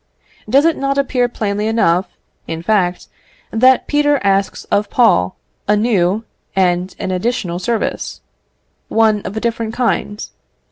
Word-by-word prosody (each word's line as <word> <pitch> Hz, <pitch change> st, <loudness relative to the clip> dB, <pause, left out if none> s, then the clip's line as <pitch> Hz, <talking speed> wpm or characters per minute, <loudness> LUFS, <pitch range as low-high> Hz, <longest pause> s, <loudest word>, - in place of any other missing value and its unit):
Does 275 Hz, +3 st, +4 dB
it 330 Hz, -2 st, +2 dB
not 275 Hz, 0 st, -1 dB
appear 255 Hz, -3 st, +1 dB
plainly 210 Hz, -2 st, -2 dB
enough, 190 Hz, -5 st, +2 dB, 0.4 s
in 165 Hz, 0 st, -5 dB
fact, 185 Hz, -3 st, 0 dB, 0.4 s
that 255 Hz, +3 st, +4 dB
Peter 290 Hz, -1 st, +2 dB
asks 195 Hz, 0 st, +1 dB
of 205 Hz, 0 st, +1 dB
Paul 95 Hz, -, +3 dB, 0.3 s
a 210 Hz, -, +4 dB
new 205 Hz, -2 st, +1 dB, 0.3 s
and 180 Hz, -1 st, +1 dB
an 185 Hz, -, -3 dB
additional 185 Hz, -2 st, -2 dB
service; 225 Hz, +4 st, -2 dB, 0.7 s
one 220 Hz, -2 st, +2 dB
of 205 Hz, -, -6 dB
a -, -, +1 dB
different 230 Hz, -1 st, -2 dB
kind? 225 Hz, -3 st, -1 dB
215 Hz, 135 wpm, -17 LUFS, 185-240 Hz, 0.7 s, Does